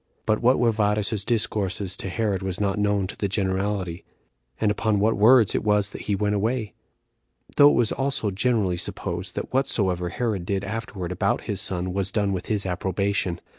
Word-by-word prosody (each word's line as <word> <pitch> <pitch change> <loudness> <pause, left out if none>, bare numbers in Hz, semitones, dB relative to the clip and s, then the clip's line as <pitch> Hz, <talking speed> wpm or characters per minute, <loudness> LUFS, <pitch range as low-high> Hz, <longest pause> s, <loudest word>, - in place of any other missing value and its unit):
But 110 -1 +1
what 125 +2 +4
were 120 -2 +3
Varus's 105 -1 0
discourses 100 -4 -1
to 95 - -4
Herod 100 -1 -1
was 95 -1 -3
not 100 0 0
known 105 -1 +1
to 95 - -6
the 100 - -2
generality, 95 -2 -2 0.6
and 105 -2 +2
upon 105 0 0
what 110 +2 +2
words 110 +1 +5
it - - -1
was 105 -1 +2
that - - -8
he 100 - -1
went 105 +1 0
away; 110 +1 -1 0.8
though 145 0 +8
it - - +2
was 115 -3 +2
also 135 -6 -1
generally 100 -3 +1
supposed 85 +2 -4
that - - -5
whatsoever 95 -9 +1
Herod 105 -1 -2
did 95 +2 -2
afterward 100 -4 -5
about 90 - 0
his 100 -1 -2
son 90 -2 -1
was 100 0 -1
done 100 -2 0
with 90 - -4
his 105 -2 -1
approbation. 95 0 -1
100 Hz, 185 wpm, -24 LUFS, 95-110 Hz, 0.8 s, though